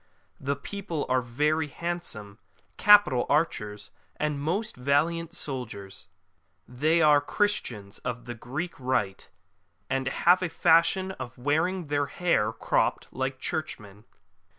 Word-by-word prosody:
The 140 +1 -1
people 170 +1 -4
are 130 0 +3
very 150 +6 0
handsome, 140 - -5 0.4
capital 205 -12 +6
archers, 105 -9 -1 0.2
and 150 -2 -2
most 195 +9 -2
valiant 160 +6 0
soldiers. 120 - -6 0.6
They 155 +7 +2
are 150 -1 +6
Christians 125 - -2
of 120 -2 -5
the 120 - -5
Greek 135 +10 -5
Rite, 105 -8 -1 0.6
and 135 0 0
have 175 +7 +4
a 180 - -1
fashion 170 +4 +3
of 120 +1 -7
wearing 160 +7 0
their 145 -1 0
hair 155 -13 +1
cropped, - - 0
like 130 0 -3
Churchmen.'' 105 -10 -4
145 Hz, 120 wpm, -27 LUFS, 120-170 Hz, 0.6 s, capital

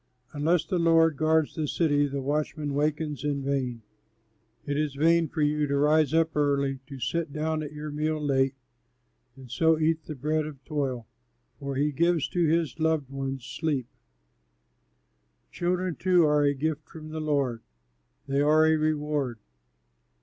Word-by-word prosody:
Unless 155 +3 +1
the 185 -3 -1
Lord 165 -1 +4
guards 155 +1 +2
the 155 -2 -2
city, 145 -2 +2
the 140 -1 -4
watchman 150 +1 -2
wakens 150 0 -1
in 145 -2 -1
vain. 130 -4 -2 0.8
It 145 - -2
is 150 -1 -1
vain 165 +3 +3
for 155 +1 -2
you 150 0 +1
to 140 0 0
rise 150 0 +3
up 165 0 +2
early, 140 -2 +1
to 140 - -8
sit 165 +5 -2
down 155 +1 -2
at 150 - -6
your 150 0 -6
meal 155 +1 -1
late, 135 -2 +1 0.8
And 130 -3 -13
so 160 +4 +3
eat 160 0 0
the 155 - -6
bread 155 +3 -1
of 145 -3 -11
toil; 135 -6 -2 0.5
for 140 -1 -4
he 145 +2 +1
gives 170 +1 +1
to 175 - 0
his 160 -3 +1
loved 160 -4 0
ones 135 -2 -4
sleep. 145 -2 -2 1.7
Children 180 0 -1
too 180 -3 +4
are 150 -1 +3
a 145 0 +2
gift 155 +2 -3
from 155 -1 -10
the 155 0 -5
Lord, 140 -6 0 0.7
they 140 +1 +1
are 155 +2 +5
a 160 0 +4
reward. 150 -5 -1
150 Hz, 160 wpm, -27 LUFS, 140-160 Hz, 1.7 s, are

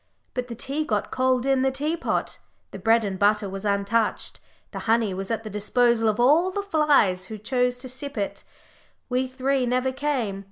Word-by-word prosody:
But 250 -1 -3
the 235 - -6
tea 275 +6 -2
got 210 -8 -2
cold 255 -1 +1
in 270 -1 +2
the 265 - +3
teapot, 300 +5 -2 0.3
the - - -8
bread 225 0 +3
and 190 -2 -4
butter 205 0 +3
was 195 +1 -6
untouched, 205 +2 0 0.3
the - - -5
honey 225 -3 +3
was 195 +1 -5
at 225 -1 -2
the 215 - -6
disposal 225 +2 +2
of 215 +2 -1
all 305 +9 +5
the 400 +2 -3
flies 290 - +3
who 220 - -6
chose 250 +3 0
to 255 +1 -6
sip 260 +1 -7
it 200 -1 -3 0.7
we 255 +1 0
three 260 0 0
never 255 +2 +1
came! 260 -8 -2
245 Hz, 190 wpm, -25 LUFS, 210-265 Hz, 0.7 s, all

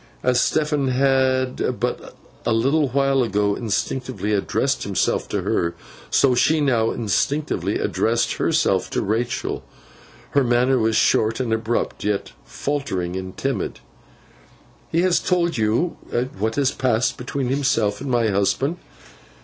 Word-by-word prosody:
As 125 -1 +3
Stephen 150 -3 +1
had 130 0 +1
but - - -3 0.3
a - - 0
little 140 +6 +2
while 135 +1 +2
ago 105 -3 +1
instinctively 115 +1 -2
addressed 135 +6 0
himself 100 -2 0
to - - -2
her, 85 0 0 0.3
so 135 -2 +4
she 155 +6 +3
now 120 -6 +2
instinctively 110 - -1
addressed 115 +1 0
herself - - +1
to - - -1
Rachael. 120 +4 -2 0.7
Her 140 - +3
manner 125 +2 +3
was 110 0 +1
short 110 +1 +2
and 120 -3 0
abrupt, 110 +1 -2
yet 105 -1 -1
faltering 95 -12 -3
and 95 0 -6
timid. - - -2 1.1
'He 170 +2 +2
has 185 -2 +3
told 170 -6 0
you 110 +11 +1 0.4
what 110 +2 -1
has 140 -2 +2
passed 125 -1 +1
between 125 +1 -3
himself 130 -7 +1
and 140 - -4
my 120 -3 +2
husband? 105 - 0
125 Hz, 135 wpm, -22 LUFS, 110-135 Hz, 1.1 s, so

